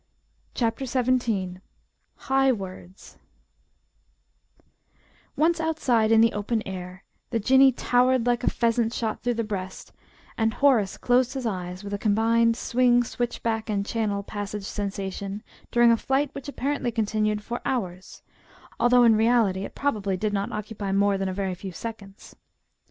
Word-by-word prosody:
CHAPTER 230 Hz, +2 st, -1 dB
XVII 240 Hz, -8 st, 0 dB, 0.6 s
HIGH 270 Hz, 0 st, +2 dB
WORDS 185 Hz, -2 st, -10 dB, 2.2 s
Once 330 Hz, +2 st, +2 dB
outside 260 Hz, -9 st, +1 dB
in 225 Hz, 0 st, +6 dB
the 230 Hz, 0 st, +4 dB
open 215 Hz, +2 st, -2 dB
air, 185 Hz, 0 st, -7 dB, 0.3 s
the 230 Hz, -, -1 dB
Jinnee 265 Hz, +4 st, +5 dB
"towered" 250 Hz, 0 st, +2 dB
like 245 Hz, 0 st, +1 dB
a -, -, +3 dB
pheasant 230 Hz, 0 st, 0 dB
shot 220 Hz, -2 st, -2 dB
through 245 Hz, 0 st, -1 dB
the 230 Hz, -, -1 dB
breast, 190 Hz, -3 st, -6 dB, 0.5 s
and 220 Hz, -1 st, +1 dB
Horace 245 Hz, -9 st, +3 dB
closed 250 Hz, +1 st, +2 dB
his 260 Hz, -2 st, -4 dB
eyes 180 Hz, -3 st, -4 dB
with 200 Hz, 0 st, -6 dB
a 200 Hz, -, -2 dB
combined 230 Hz, +2 st, +2 dB
swing 245 Hz, 0 st, +3 dB
switchback 230 Hz, -2 st, -3 dB
and 200 Hz, -1 st, -1 dB
Channel 210 Hz, -3 st, -2 dB
passage 205 Hz, 0 st, -5 dB
sensation 200 Hz, 0 st, -4 dB, 0.3 s
during 240 Hz, -1 st, +5 dB
a 230 Hz, -, +4 dB
flight 270 Hz, +4 st, 0 dB
which 275 Hz, -, -8 dB
apparently 280 Hz, -2 st, -2 dB
continued 215 Hz, -1 st, -1 dB
for 240 Hz, +3 st, -5 dB
hours, 185 Hz, -7 st, -4 dB, 0.6 s
although 245 Hz, 0 st, +5 dB
in 230 Hz, -2 st, +6 dB
reality 220 Hz, -4 st, +2 dB
it -, -, -10 dB
probably 205 Hz, -9 st, -1 dB
did 210 Hz, +2 st, -2 dB
not 200 Hz, 0 st, -2 dB
occupy 210 Hz, -1 st, -5 dB
more 200 Hz, +1 st, +2 dB
than 195 Hz, 0 st, -2 dB
a -, -, -2 dB
very 195 Hz, -1 st, -2 dB
few 185 Hz, +1 st, -7 dB
seconds. 200 Hz, 0 st, -9 dB
225 Hz, 145 wpm, -25 LUFS, 200-245 Hz, 2.2 s, in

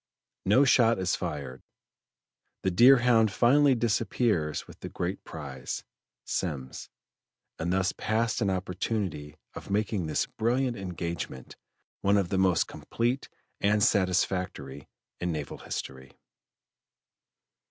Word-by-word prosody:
No 130 Hz, +8 st, +5 dB
shot 115 Hz, -3 st, +4 dB
is 95 Hz, -1 st, 0 dB
fired: 70 Hz, -3 st, -5 dB, 1.0 s
the 95 Hz, -, +1 dB
Deerhound 120 Hz, +1 st, +6 dB
finally 135 Hz, +5 st, +4 dB
disappears 110 Hz, -, 0 dB
with -, -, -15 dB
the -, -, -7 dB
great 90 Hz, +3 st, -4 dB
prize, 70 Hz, -5 st, -6 dB, 0.4 s
Semmes, 70 Hz, -7 st, -4 dB, 0.7 s
and 85 Hz, +2 st, -1 dB
thus 95 Hz, 0 st, +1 dB
passed 115 Hz, +2 st, -1 dB
an 100 Hz, -, +2 dB
opportunity 90 Hz, -4 st, -3 dB, 0.2 s
of -, -, -9 dB
making 100 Hz, -3 st, 0 dB
this 75 Hz, -, 0 dB
brilliant 125 Hz, +2 st, 0 dB
engagement 85 Hz, -, -5 dB, 0.5 s
one 100 Hz, +1 st, +3 dB
of 95 Hz, -3 st, 0 dB
the 95 Hz, -, 0 dB
most 95 Hz, -3 st, +3 dB
complete 120 Hz, +4 st, -2 dB, 0.3 s
and 105 Hz, +1 st, +2 dB
satisfactory 90 Hz, -, 0 dB, 0.3 s
in 90 Hz, 0 st, -1 dB
naval 75 Hz, -3 st, -5 dB
history. 65 Hz, -1 st, -7 dB
95 Hz, 110 wpm, -28 LUFS, 80-115 Hz, 1.0 s, Deerhound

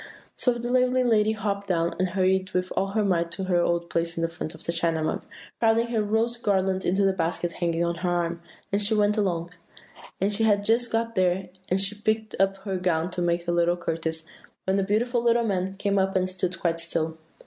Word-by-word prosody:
"So 250 Hz, -, +2 dB
the 240 Hz, 0 st, -4 dB
lovely 255 Hz, 0 st, +3 dB
lady 220 Hz, -3 st, +3 dB
hopped 200 Hz, -2 st, -3 dB
down, 170 Hz, -2 st, +1 dB
and 185 Hz, 0 st, +1 dB
hurried 185 Hz, 0 st, +1 dB
with 180 Hz, 0 st, -1 dB
all 195 Hz, -, +1 dB
her 215 Hz, -1 st, +1 dB
might 170 Hz, -3 st, +1 dB
to 190 Hz, -, -4 dB
her 180 Hz, -2 st, +2 dB
old 170 Hz, 0 st, 0 dB
place 170 Hz, 0 st, -1 dB
on 165 Hz, -, -1 dB
the 165 Hz, -, +1 dB
front 165 Hz, -1 st, -6 dB
of -, -, -13 dB
the -, -, -1 dB
China 165 Hz, -1 st, 0 dB
Mug, 155 Hz, -, -2 dB, 0.4 s
crowding 230 Hz, +1 st, +3 dB
her 225 Hz, -2 st, +1 dB
rose 225 Hz, +3 st, 0 dB
garland 190 Hz, -4 st, +1 dB
into 195 Hz, +2 st, +2 dB
the 195 Hz, -, +3 dB
basket 170 Hz, -1 st, -1 dB
hanging 170 Hz, -1 st, -1 dB
on 170 Hz, -, 0 dB
her 180 Hz, +1 st, -1 dB
arm 170 Hz, -1 st, -1 dB, 0.3 s
as 205 Hz, +1 st, +2 dB
she 215 Hz, +2 st, +2 dB
went 210 Hz, 0 st, +3 dB
along. 175 Hz, -5 st, -1 dB, 0.7 s
And 200 Hz, +2 st, +1 dB
she 220 Hz, +2 st, +2 dB
had 205 Hz, -2 st, +3 dB
just 235 Hz, +2 st, +2 dB
got 230 Hz, 0 st, 0 dB
there, 185 Hz, -1 st, +1 dB, 0.2 s
and 185 Hz, -, +2 dB
was 195 Hz, +1 st, +2 dB
picking 220 Hz, -1 st, 0 dB
up 195 Hz, 0 st, +2 dB
her 190 Hz, -2 st, -2 dB
gown 180 Hz, -1 st, 0 dB
to 180 Hz, -, -2 dB
make 170 Hz, 0 st, 0 dB
a -, -, +2 dB
little 175 Hz, 0 st, +2 dB
courtesy, 160 Hz, -1 st, -3 dB, 0.4 s
when 190 Hz, +1 st, +1 dB
the 195 Hz, -, +2 dB
beautiful 235 Hz, +5 st, +1 dB
little 235 Hz, 0 st, +3 dB
man 190 Hz, -3 st, -1 dB
came 200 Hz, 0 st, 0 dB
up 190 Hz, 0 st, 0 dB
and 185 Hz, 0 st, +2 dB
stood 185 Hz, -1 st, -3 dB
quite 165 Hz, -1 st, 0 dB
still. 165 Hz, -1 st, -2 dB
190 Hz, 225 wpm, -26 LUFS, 170-210 Hz, 0.7 s, lovely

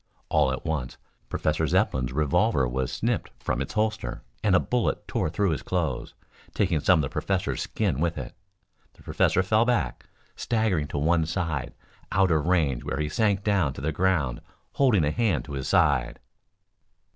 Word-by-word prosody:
All 65 Hz, -, +3 dB
at 65 Hz, -, -5 dB
once 75 Hz, -6 st, -3 dB, 0.3 s
Professor 80 Hz, +1 st, 0 dB
Zepplin's 65 Hz, -2 st, +1 dB
revolver 70 Hz, -2 st, +2 dB
was 65 Hz, +1 st, -2 dB
snipped -, -, -1 dB
from 60 Hz, -, -2 dB
its 70 Hz, -, -4 dB
holster 110 Hz, -, -2 dB, 0.2 s
and 100 Hz, -3 st, +4 dB
a -, -, +6 dB
bullet 125 Hz, -2 st, -1 dB
tore -, -, -1 dB
through 95 Hz, +3 st, 0 dB
his 75 Hz, -, -2 dB
clothes, -, -, -2 dB, 0.4 s
taking 90 Hz, -6 st, +1 dB
some 90 Hz, +4 st, +4 dB
of -, -, +2 dB
the 70 Hz, -, -2 dB
professor's 95 Hz, -2 st, -1 dB
skin 65 Hz, -, -1 dB
with 85 Hz, 0 st, 0 dB
it. 65 Hz, -4 st, -6 dB, 0.6 s
The -, -, -20 dB
professor 95 Hz, -, +2 dB
fell 110 Hz, +4 st, +3 dB
back, 120 Hz, 0 st, -1 dB, 0.3 s
staggering 110 Hz, -10 st, 0 dB
to 75 Hz, -, -5 dB
one 80 Hz, +2 st, +2 dB
side 80 Hz, -6 st, -3 dB, 0.4 s
out 95 Hz, -2 st, +3 dB
of 80 Hz, -1 st, +1 dB
range 80 Hz, -9 st, +1 dB
where 70 Hz, -, -3 dB
he 75 Hz, 0 st, -1 dB
sank 105 Hz, -1 st, +1 dB
down 95 Hz, -10 st, +1 dB
to 65 Hz, -, -8 dB
the 80 Hz, +3 st, -1 dB
ground 80 Hz, -7 st, 0 dB, 0.3 s
holding 115 Hz, -, +3 dB
a 75 Hz, -, +1 dB
hand 95 Hz, -, 0 dB
to 75 Hz, -, -8 dB
his 65 Hz, -1 st, -4 dB
side. -, -, +2 dB
80 Hz, 175 wpm, -26 LUFS, 70-95 Hz, 0.6 s, a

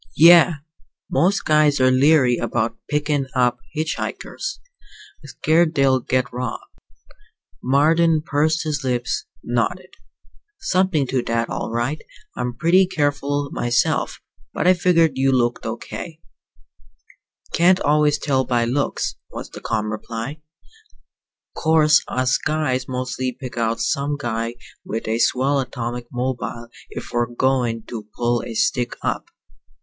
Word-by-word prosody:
"Yeah. 170 Hz, +1 st, +8 dB, 0.6 s
Most 195 Hz, +4 st, +2 dB
guys 150 Hz, -2 st, +3 dB
are 130 Hz, 0 st, +4 dB
leery 130 Hz, -2 st, +4 dB
about 115 Hz, -1 st, -1 dB
pickin' 145 Hz, -2 st, 0 dB
up 125 Hz, -1 st, +2 dB
hitch 155 Hz, 0 st, -2 dB
hikers. 395 Hz, +1 st, -5 dB, 0.6 s
Scared 160 Hz, +3 st, +1 dB
they'll 135 Hz, -2 st, +3 dB
get 125 Hz, 0 st, -1 dB
robbed." 125 Hz, -1 st, -4 dB, 1.0 s
Marden 155 Hz, +4 st, +3 dB
pursed 155 Hz, +2 st, +1 dB
his 150 Hz, -2 st, -2 dB
lips, 125 Hz, -1 st, -1 dB, 0.2 s
nodded. 180 Hz, +11 st, -2 dB, 0.7 s
"Something 185 Hz, -, +1 dB
to 130 Hz, 0 st, -1 dB
that, 115 Hz, 0 st, -1 dB
all -, -, -3 dB
right. 120 Hz, +7 st, -2 dB, 0.3 s
I'm 125 Hz, -, -2 dB
usually 120 Hz, -1 st, -7 dB
pretty 180 Hz, +7 st, +4 dB
careful 145 Hz, -4 st, -1 dB
myself; 120 Hz, +1 st, 0 dB, 0.4 s
but -, -, -1 dB
I 185 Hz, -, +7 dB
figured 165 Hz, -6 st, +2 dB
you 135 Hz, 0 st, +3 dB
looked 120 Hz, -2 st, 0 dB
okay." 155 Hz, +8 st, -6 dB, 1.3 s
"Can't 180 Hz, +2 st, +4 dB
always 150 Hz, 0 st, +3 dB
tell 135 Hz, -3 st, 0 dB
by 120 Hz, -2 st, +1 dB
looks," 135 Hz, +4 st, -1 dB
was -, -, -8 dB
the -, -, -10 dB
calm 110 Hz, -1 st, -2 dB
reply. 115 Hz, +7 st, -6 dB, 1.1 s
"'Course 155 Hz, -1 st, +4 dB
us 130 Hz, 0 st, +1 dB
guys 130 Hz, -5 st, -1 dB
mostly 130 Hz, 0 st, -3 dB
pick 130 Hz, -3 st, -7 dB
out 115 Hz, -1 st, -1 dB
some 145 Hz, +1 st, -1 dB
guy 115 Hz, -3 st, -3 dB, 0.3 s
with 110 Hz, 0 st, -5 dB
a 110 Hz, +1 st, 0 dB
swell 135 Hz, +4 st, +2 dB
atomic 120 Hz, -2 st, -4 dB
mobile 125 Hz, -2 st, -4 dB, 0.2 s
if -, -, -8 dB
we're 120 Hz, 0 st, +1 dB
goin' 120 Hz, -2 st, 0 dB
to 110 Hz, -3 st, -8 dB
pull 120 Hz, 0 st, 0 dB
a 115 Hz, -, -7 dB
stick 120 Hz, +2 st, 0 dB
up. -, -, -2 dB
130 Hz, 130 wpm, -21 LUFS, 120-155 Hz, 1.3 s, Yeah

